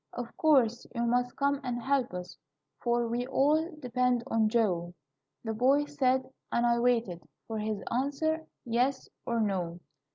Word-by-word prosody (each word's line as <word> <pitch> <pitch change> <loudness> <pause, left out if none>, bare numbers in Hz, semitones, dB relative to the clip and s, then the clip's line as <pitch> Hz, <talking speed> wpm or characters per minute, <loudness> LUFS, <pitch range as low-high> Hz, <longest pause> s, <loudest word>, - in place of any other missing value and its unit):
'Of 240 -1 -6
course, 250 -7 +3
you 235 - 0
must 245 +1 +1
come 280 0 +1
and 245 -2 -2
help 265 +1 0
us, 180 0 -6 0.5
For 240 -1 +1
we 240 +2 -2
all 300 +5 +2
depend 250 -2 +1
on 220 -1 +2
Joe,' 180 -7 0 0.5
The 225 -1 -2
boys 280 +5 +2
said; 260 -2 +2 0.2
and 235 - +2
I 235 0 +3
waited 230 -8 +1 0.2
For 220 -1 -4
his 215 -1 -3
answer 305 +5 0 0.2
yes 250 +3 0 0.2
or 235 -1 0
no. 180 -5 -1
240 Hz, 155 wpm, -30 LUFS, 225-270 Hz, 0.5 s, course